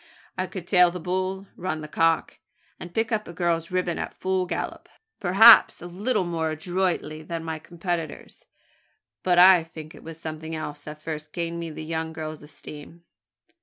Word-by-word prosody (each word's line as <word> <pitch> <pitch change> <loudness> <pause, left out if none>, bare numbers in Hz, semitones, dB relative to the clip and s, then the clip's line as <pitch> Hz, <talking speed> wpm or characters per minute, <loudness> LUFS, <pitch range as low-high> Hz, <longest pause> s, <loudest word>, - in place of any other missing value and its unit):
I 185 - -2
could 185 -2 -7
`tail 180 -2 +5
the 180 - -6
bull,' 185 +3 -2
`run 160 -3 -3
the 155 - -7
cock,' 165 +1 +1 0.4
and 175 - -8
pick 225 +5 -1
up 215 -1 -1
a 170 - -8
girl's 170 -1 0
ribbon 180 -2 -1
at - - -5
full 185 -1 -1
gallop - - -4 0.3
perhaps 210 +4 +8
a - - -9
little 200 +5 -1
more 165 -2 -1
adroitly 165 -1 -2
than 165 +1 -5
my 160 -1 -4
competitors; 170 -1 -5 0.7
but 180 -1 +2
I 180 0 +8
think 160 -1 -10
it - - -13
was 165 0 -9
something 160 0 -6
else 150 -2 -6
that 150 0 -9
first 155 -1 -6
gained 170 0 -3
me 170 -1 -4
the 155 0 -7
young 160 0 -3
girl's 155 -1 -6
esteem. 150 +2 -12
170 Hz, 175 wpm, -25 LUFS, 160-180 Hz, 0.7 s, perhaps